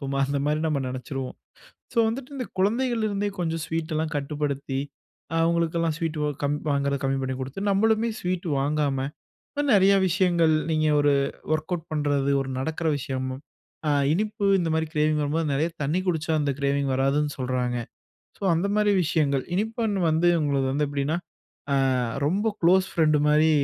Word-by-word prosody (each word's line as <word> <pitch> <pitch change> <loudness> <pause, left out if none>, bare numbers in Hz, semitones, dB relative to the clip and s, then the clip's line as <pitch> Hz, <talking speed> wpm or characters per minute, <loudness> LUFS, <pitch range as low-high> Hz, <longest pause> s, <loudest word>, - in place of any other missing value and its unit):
சும்மா 135 -1 -3
அந்த 140 +1 -1
மாதிரி 150 +1 +1
நம்ம 150 -3 0
நெனச்சுருவோம். 130 +1 -5 0.6
ஸோ 235 - 0
வந்துட்டு 250 +4 -4
இந்த 255 - -3
குழந்தைகள்லருந்தே 215 -1 +1
கொஞ்சம் 165 -2 -1
ஸ்வீட்லாம் 160 -1 -2
கட்டுப்படுத்தி, 140 -2 -2 0.6
அவங்களுக்கெல்லாம் 165 0 +1
ஸ்வீட் 165 -2 -2
வ் 150 - +1
கம் 145 +1 +1
வாங்குறது 140 -1 0
கம்மி 135 0 +1
பண்ணி 130 0 -2
குடுத்து. 135 +8 -5
நம்மளுமே 220 +3 +2
ஸ்வீட் 180 0 -2
வாங்காம, 145 -1 0 0.7
நெறய 195 -1 +6 0.2
விஷயங்கள் 175 -2 +3 0.2
நீங்க 155 -1 +2
ஒரு 145 0 +4 0.4
ஒர்கவுட் 165 +1 -3
பண்றது, 145 -2 +1
ஒரு 135 -1 -4
நடக்குற 160 +4 -2
விஷயம், 130 0 -3 0.6
அ - - +3 0.2
இனிப்பு 210 +3 -1 0.2
இந்த 170 - -1
மாதிரி 160 0 0
க்ரேவிங் 150 0 +2
வரும்போது 155 +2 0
நெறைய 155 +4 +1 0.2
தண்ணீ 160 +6 0
குடிச்சா 160 -2 -1
அந்த 145 -1 0
க்ரேவிங் 140 0 +1
வராதுன்னு 140 +3 +1
சொல்றாங்க. 125 -1 -1 0.6
ஸோ - - -8
அந்த 175 +5 0
மாதிரி 210 -1 +3
விஷயங்கள் 145 -5 +1
இனிப்பன் 220 0 -1
வந்து 160 +2 +2
உங்களுக்கு 140 -3 +1
வந்து 145 0 +1
எப்டின்னா 145 +3 -1 0.6
அ - - +3 0.5
ரொம்ப 195 +8 0
க்ளோஸ் 185 +2 +4
ஃப்ரெண்டு 155 -2 +3
மாதிரி 155 +1 +4
155 Hz, 150 wpm, -25 LUFS, 140-175 Hz, 0.7 s, நெறய